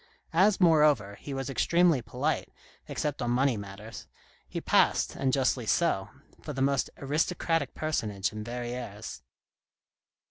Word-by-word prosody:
As, 190 +4 +4
moreover, 150 - +4
he 145 - -7
was 135 -1 -3
extremely 170 +1 +3
polite, 125 +8 -2 0.4
except 145 -2 -3
on 120 - -1
money 130 +1 +2
matters, 100 +2 -9 0.4
he - - -3
passed, - - +2
and 135 -1 0
justly 130 -3 +1
so, 105 - +1 0.3
for 150 - -6
the 135 - -5
most 140 -3 +1
aristocratic 155 +1 0
personage 110 -10 -1
in 110 0 -5
Verrieres. 120 - -6
135 Hz, 130 wpm, -29 LUFS, 115-155 Hz, 0.4 s, As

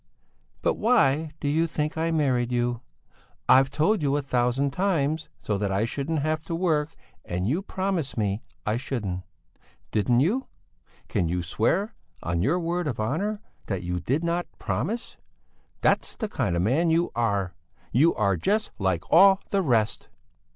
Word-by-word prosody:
But - - +1
why 160 - +3
do 145 - -3
you 160 +3 +2
think 150 -1 -2
I 165 +1 0
married 130 -7 +1
you? 120 -1 0 0.7
I've 130 +1 +6
told 155 +8 +1
you 145 -1 +1
a 145 - -2
thousand 130 +2 +1
times 160 -3 0
so 105 -2 -2
that 100 -1 -1
I 100 +3 +1
shouldn't 145 +5 -2
have 155 0 -1
to 165 - -3
work 160 -3 0 0.3
and 90 +2 -2
you 155 - +1
promised 185 -9 -2
me 105 0 0 0.2
I 105 +2 +1
shouldn't. 110 -8 -3 0.7
Didn't 120 +3 +3
you? 225 - +1 0.6
Can 85 - 0
you 90 +1 -1
swear, 145 - 0 0.3
on 85 -1 -1
your 150 - +2
word 175 0 -1
of 125 -7 -3
honour, 195 - -1 0.3
that 95 -3 -2
you 90 0 -2
did 140 - -1
not 170 +1 -1
promise? 230 +4 -3 0.6
That's - - +2
the 220 - -3
kind 120 - -1
of 85 - +1
man 145 - +2
you 165 +2 +2
are! 100 -6 0 0.4
You 155 +7 +4
are 100 -3 +2
just 215 - 0
like 95 -4 0
all 195 0 +8
the 200 - +2
rest!" 115 - 0
140 Hz, 165 wpm, -26 LUFS, 110-170 Hz, 0.7 s, all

